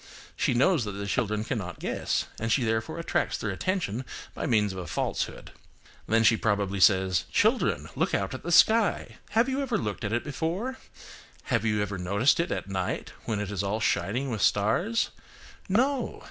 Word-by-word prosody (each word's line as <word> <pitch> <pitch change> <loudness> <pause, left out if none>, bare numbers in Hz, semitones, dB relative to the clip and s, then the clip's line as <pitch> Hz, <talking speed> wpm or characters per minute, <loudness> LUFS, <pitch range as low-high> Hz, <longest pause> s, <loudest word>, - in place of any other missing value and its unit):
She - - +1
knows 140 +3 +3
that 105 - -4
the 100 +1 -5
children 105 +1 0
cannot 105 -7 -4
guess, - - -1
and 115 +1 -1
she 130 - +3
therefore 115 +7 -1
attracts 170 - -1
their 105 - -3
attention 130 - -2 0.3
by - - -3
means 105 -4 +2
of 95 - -6
a 90 - -6
falsehood. - - -3 0.6
Then 115 0 +3
she 115 - +6
probably 100 -3 0
says,–"Children, 95 -2 +3
look - - +1
out 95 +3 -2
at 130 - -6
the 175 - -4
sky. 220 +5 +4 0.2
Have 235 +2 +5
you 270 +1 -1
ever 265 -4 0
looked 105 0 -4
at 105 - -2
it 120 +1 0
before? 175 - -3 0.6
Have 115 - 0
you 105 -1 +1
never 105 -2 -2
noticed 100 - +2
it 170 - 0
at - - -3
night 95 -2 -3
when 110 -3 -1
it 105 -1 -3
is 100 - -2
all 100 +2 -1
shining 115 +6 0
with 110 -4 -3
stars? 140 - +2 0.6
No! 255 +7 +1
110 Hz, 180 wpm, -27 LUFS, 100-165 Hz, 0.6 s, she